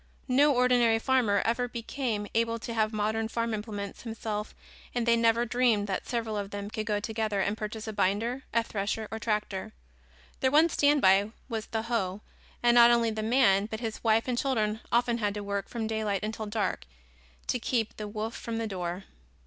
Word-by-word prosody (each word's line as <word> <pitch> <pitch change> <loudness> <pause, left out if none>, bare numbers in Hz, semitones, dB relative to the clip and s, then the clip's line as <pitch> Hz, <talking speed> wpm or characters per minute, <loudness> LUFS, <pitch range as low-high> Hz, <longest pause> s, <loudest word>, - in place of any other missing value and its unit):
No 285 +3 +5
ordinary 245 -2 +4
farmer 225 -4 +2
ever 240 +2 +1
became 235 -2 -3
able 230 0 +1
to 230 +1 -6
have 220 -1 +1
modern 220 +1 -1
farm 230 0 -2
implements 205 -2 -5
himself 220 -2 -4 0.4
and 240 -1 0
they 235 -1 +5
never 230 +1 +3
dreamed 240 -3 +2
that 195 -2 -3
several 230 -3 -2
of 200 -1 -3
them 205 0 -6
could 215 0 -4
go 210 -1 +1
together 220 -1 -2
and 200 +2 0
purchase 220 0 -5
a 220 - -4
binder, 210 +6 0
a 230 - +2
thresher 210 0 -3
or 220 - -4
tractor. 210 - -2 0.7
Their 260 - +3
one 310 +5 +5
standby 215 - +4 0.2
was 225 -3 -4
the 220 -1 -2
hoe 210 -4 -2 0.4
and 240 0 +5
not 240 0 +8
only 235 -1 +3
the 215 0 -3
man 215 -4 +3
but 220 0 -5
his 225 -2 -5
wife 225 +1 +3
and 245 -1 0
children 220 -5 0
often 235 0 +2
had 205 -2 -1
to 205 - -4
work 200 0 -3
from 230 -2 -3
daylight 215 -3 -1
until 215 0 -4
dark 205 - -2 0.6
to 250 - -1
keep 230 -2 -1
the 210 - -5
wolf 215 +2 -4
from 230 -1 -4
the 225 - -1
door. 180 -2 -4
220 Hz, 190 wpm, -29 LUFS, 210-235 Hz, 0.7 s, not